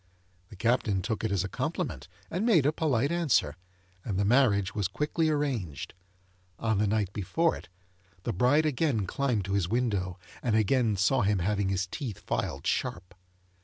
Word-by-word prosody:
The - - -12
Captain 105 -3 +1
took 110 +1 -2
it 110 - 0
as 95 -2 +1
a - - -2
compliment, - - -3 0.2
and 180 +5 -1
made 195 - +4
a 150 - +4
polite 140 -3 +1
answer, 155 - +2 0.5
and 100 -4 -3
the 100 - +2
marriage 105 -5 +3
was 105 -4 0
quickly 150 - 0
arranged. 130 - -2 0.6
On 110 -3 0
the 105 - +2
night 100 -2 0
before 165 - +1
it, - - -11 0.5
the - - -2
bride 130 - +3
again 140 -7 +1
climbed 120 -2 -1
to 100 - -3
his 95 -3 +1
window, 100 -7 0 0.2
and 115 -3 +1
again 110 0 +2
saw 120 +7 +3
him 105 -1 +2
having 100 +2 0
his 95 -1 0
teeth 110 - -5
filed - - -3
sharp. 90 +1 -2
110 Hz, 170 wpm, -29 LUFS, 100-140 Hz, 0.6 s, made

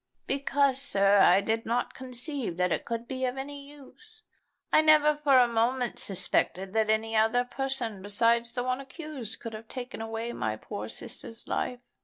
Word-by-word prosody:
"Because, 275 -1 +1
sir, 200 -6 +3
I 190 0 +6
did 225 +2 -1
not 240 +2 -1
conceive 255 - -4
that 180 -1 +1
it - - -1
could 230 0 -4
be 260 0 -4
of 250 +1 -2
any 280 +1 -6
use. 435 +10 -16 0.5
I - - +7
never 305 -1 +5
for 290 -3 +4
a 250 -1 +6
moment 235 +1 0
suspected 190 0 0
that 220 -1 +2
any 220 +1 +1
other 225 +3 +3
person 245 -6 -3
besides 230 +4 +1
the 245 - -2
one 255 +1 -1
accused 275 -4 -8
could 230 -2 -7
have 220 +1 -9
taken 245 -2 -6
away 225 +1 -4
my 110 0 -2
poor 105 0 -6
sister's 225 - -8
life. 250 -1 -2
240 Hz, 175 wpm, -28 LUFS, 220-270 Hz, 0.5 s, I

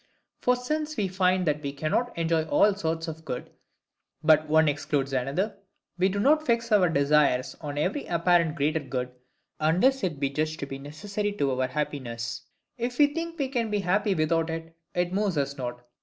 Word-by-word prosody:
For 250 - +3
since 305 +4 -3
we 205 -3 +1
find 185 0 +2
that 150 -1 0
we 140 -2 -3
cannot 155 - -1
enjoy 165 -1 +2
all 205 +5 +4
sorts 165 -3 -2
of 160 0 -7
good, 125 -5 -5 0.7
but 155 0 +5
one 160 0 +5
excludes 145 -1 -1
another; 140 - -1 0.4
we 190 +1 +4
do 200 +1 -2
not 305 +7 +4
fix 235 -4 0
our 190 -4 +5
desires 140 -3 +2
on 145 -2 -5
every 190 - -1
apparent 170 -2 +2
greater 155 +1 +1
good, 125 -3 -4 0.5
unless 185 +13 +3
it 165 -7 -1
be 140 -1 0
judged 155 +2 -2
to - - -1
be 135 0 -7
necessary 200 +9 -4
to 140 -9 0
our 130 - +1
happiness: 125 -4 -4 0.4
if 245 +1 -2
we 290 -1 +4
think 335 +1 -4
we 280 -4 0
can 240 -4 -1
be 210 -1 0
happy 195 +2 +1
without 165 +1 +1
it, 165 0 -6 0.2
it 175 0 0
moves 200 -4 0
us 140 0 -1
not. 120 -2 -5
165 Hz, 185 wpm, -27 LUFS, 145-205 Hz, 0.7 s, but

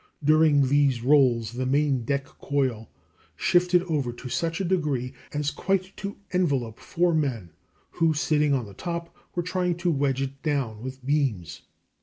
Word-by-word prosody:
During 150 -2 +5
these 140 -3 +2
rolls 125 -5 +4
the 125 +2 -3
main 135 -3 +1
deck 140 +2 -1
coil 130 -6 -2 0.5
shifted 180 -1 +3
over 150 -8 -1
to 125 +2 -9
such 165 +6 -1
a 195 - -1
degree 150 -8 -1 0.2
as 150 0 -1
quite 190 0 -1
to 200 +1 -5 0.2
envelop 140 -11 0
four 175 0 +1
men, 125 - -1 0.4
who, 160 -1 +1
sitting 150 -1 +2
on 130 -4 +1
the 100 - -11
top, 170 - -5 0.2
were 175 - 0
trying 180 0 0
to 175 0 0
wedge 135 -2 0
it 135 0 -6
down 135 -8 -1
with 130 +1 -8
beams. 135 - -1
145 Hz, 160 wpm, -26 LUFS, 130-165 Hz, 0.5 s, During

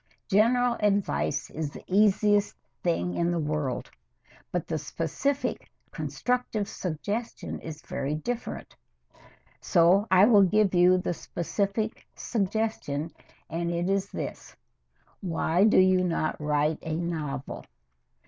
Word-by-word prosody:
General 240 +4 +3
advice 200 -8 0
is 155 -1 -3
the - - -11
easiest 205 +1 +3 0.3
thing 90 - 0
in 170 - 0
the 175 - 0
world, 150 -4 -2 0.6
but 180 -2 -1
the 160 -1 -2
specific, 165 - -2 0.2
constructive 245 -5 -2
suggestion 205 +7 -4
is 155 -1 -8
very 145 +2 -3
different. 240 +10 -5 0.8
So 180 +4 +4
I 185 +1 +7
will 215 -3 +6
give 200 +1 +3
you 180 +1 +5
the 180 -1 -1
specific 200 +6 -3
suggestion, 195 -8 -2 0.4
and 170 +1 -2
it 175 +2 0
is 195 0 0
this: - - -6 0.6
Why 175 0 +1
do 215 - +4
you 185 0 +5
not 165 -3 -1
write 150 +1 +1
a 160 -1 -3
novel? 155 -5 -4
180 Hz, 120 wpm, -27 LUFS, 160-210 Hz, 0.8 s, I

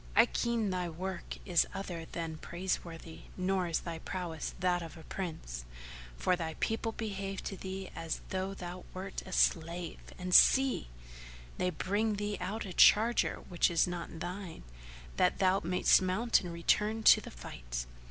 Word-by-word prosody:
I 225 +3 +8
ken 235 -4 0
thy 180 -1 -1
work 180 +2 -5
is 175 -2 +3
other 175 -4 -5
than 165 -1 -5
praiseworthy 170 -1 -4 0.2
nor 185 0 +1
is 165 - 0
thy 165 -2 -5
prowess 175 -4 -4
that 180 -1 +2
of 165 0 -8
a 160 - -11
Prince; 155 - -5 0.5
for 180 - +2
thy 160 -2 -4
people 225 0 -1
behave 195 -3 -4
to 195 - -4
thee 190 0 -6
as 165 -1 -3
though 190 +1 -2
thou 180 -1 -7
wert 190 +1 -5
a - - -8
slave;[FN#449] 170 0 0
and 180 0 -3
see! 265 - +6 0.7
they 180 - +2
bring 205 +5 0
thee 205 0 -3
out 205 +5 -3
a 185 - -6
charger 225 +7 +5
which 175 0 +2
is 170 -2 +3
not 175 -2 -5
thine, 180 - -6 0.5
that - - +3
thou 190 0 +3
mayst 180 +2 +4
mount 205 +6 +2
and 180 -3 -6
return 210 +6 +1
to - - +8
the - - -9
fight. - - -6
180 Hz, 160 wpm, -32 LUFS, 170-195 Hz, 0.7 s, I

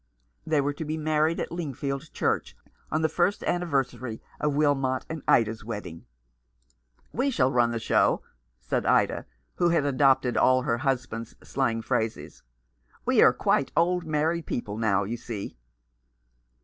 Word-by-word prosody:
They 155 -2 +3
were 145 +1 -1
to 150 - -6
be 155 +1 -3
married 155 +1 +1
at - - -3
Lingfield 140 -3 -4
Church - - -1 0.3
on 155 +1 0
the - - +4
first 180 +5 0
anniversary 135 -8 -1 0.2
of 150 -1 0
Wilmot 135 -3 +1
and 160 -1 -5
Ida's 110 -2 +3
wedding. 105 -7 -7 1.1
"We 265 +4 +1
shall 135 - +2
run 120 -2 +3
the 120 - -2
show," 115 - +2 0.4
said - - -2
Ida, - - +2 0.3
who 175 -1 +3
had 165 -4 +2
adopted 135 -2 +3
all 130 0 +4
her 120 -1 0
husband's 125 -3 -2
slang 115 -4 -1
phrases. 110 0 -2 0.3
" - - -34
We - - +4
are - - +8
quite - - +1
old 175 +1 +2
married 160 +1 -1
people 105 -4 -3
now, 105 -3 +1
you 115 +5 -4
see." 115 -3 -6
135 Hz, 150 wpm, -27 LUFS, 115-155 Hz, 1.1 s, are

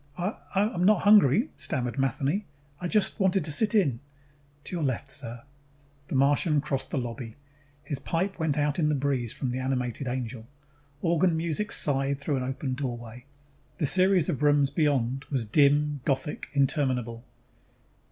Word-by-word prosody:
"I 180 +5 -2 0.2
I'm 195 -2 +1
not 205 0 +4
hungry," 205 - +5
stammered 130 -4 -2
Matheny. 135 - 0 0.3
"I 180 - -3
just 210 +4 +1
wanted 190 -3 +2
to 155 - -2
sit 210 +9 +2
in 140 - +2 0.3
" 145 0 -34
"To 180 - -6
your 165 - -2
left, 135 0 -2
sir." 120 0 -5 0.6
The - - -4
Martian 145 +3 +3
crossed 135 -2 -2
the - - -3
lobby. 120 -2 -5 0.5
His 145 -2 -3
pipe 180 +7 -2
went 155 -3 0
out 145 +2 0
in 150 -2 +2
the 150 - +1
breeze 135 -4 -1
from 125 -2 -3
an 130 - -2
animated 130 0 -2
angel. 125 -2 -4 0.6
Organ 170 0 +2
music 170 +7 -2
sighed 135 -1 +1
through 145 -1 -1
an 130 - -2
open 130 +1 -3
doorway. 120 -2 -6 0.5
The 155 - 0
series 185 +1 +4
of 145 - -2
rooms 145 -2 +3
beyond 135 -4 0
was 130 -5 -2
dim, 145 +4 +3
Gothic, 135 +1 -2
interminable. 130 -5 0
140 Hz, 160 wpm, -27 LUFS, 130-165 Hz, 0.6 s, hungry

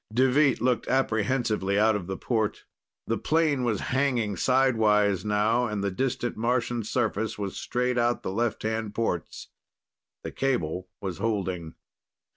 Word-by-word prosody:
Deveet 130 +4 +3
looked 125 0 0
apprehensively 110 -5 +1
out 110 +1 +4
of 95 -4 -4
the 95 0 -4
port. 110 -4 -1 0.4
The 115 - -1
plane 155 -5 +1
was 115 -4 0
hanging 125 -7 +1
sidewise 105 -6 +3
now, 105 +4 +2
and 105 -2 -3
the 100 - 0
distant 120 +2 -2
Martian 120 0 0
surface 110 0 -1
was 100 -2 -4
straight 125 0 -1
out 120 0 +1
the - - -3
left 115 +2 -1
hand 110 -1 -2
ports. 90 -8 -3 0.7
The - - -5
cable 90 -9 -1
was 95 -3 -4
holding. 95 -7 -2
110 Hz, 140 wpm, -27 LUFS, 100-125 Hz, 0.7 s, out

